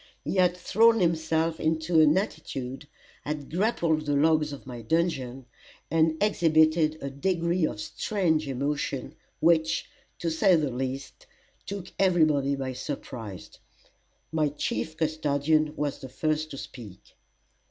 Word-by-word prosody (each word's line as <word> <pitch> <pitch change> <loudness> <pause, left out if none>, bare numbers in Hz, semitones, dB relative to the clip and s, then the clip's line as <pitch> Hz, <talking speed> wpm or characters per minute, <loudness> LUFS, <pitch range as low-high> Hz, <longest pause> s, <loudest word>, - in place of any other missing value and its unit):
He - - -2
had 180 -1 +3
thrown 225 +5 +4
himself 165 -2 +1
into 160 +1 +2
an 155 +2 +5
attitude, 135 - -4 0.4
had 150 -2 -5
grappled 165 -5 +1
the 145 - +2
logs 155 0 +3
of 140 - -9
my 125 -2 -7
dungeon, 135 -2 -1 0.5
and 160 0 +3
exhibited 160 -5 +3
a 140 - -3
degree 170 +3 0
of 105 - -6
strange 160 - 0
emotion, 140 0 -2 0.3
which, 160 -1 +3 0.3
to 170 -2 -2
say 175 +3 +4
the 150 -4 0
least, 130 +2 -5 0.4
took 195 -2 -6
everybody 155 -7 +3
by 135 -1 -4
surprise. 120 - -7 0.7
My 155 -2 +1
chief 155 +2 -3
custodian 155 -1 +1
was 145 -2 -2
the 130 - -8
first 155 +3 -1
to 140 - -8
speak. 105 -8 -11
155 Hz, 130 wpm, -27 LUFS, 140-165 Hz, 0.7 s, an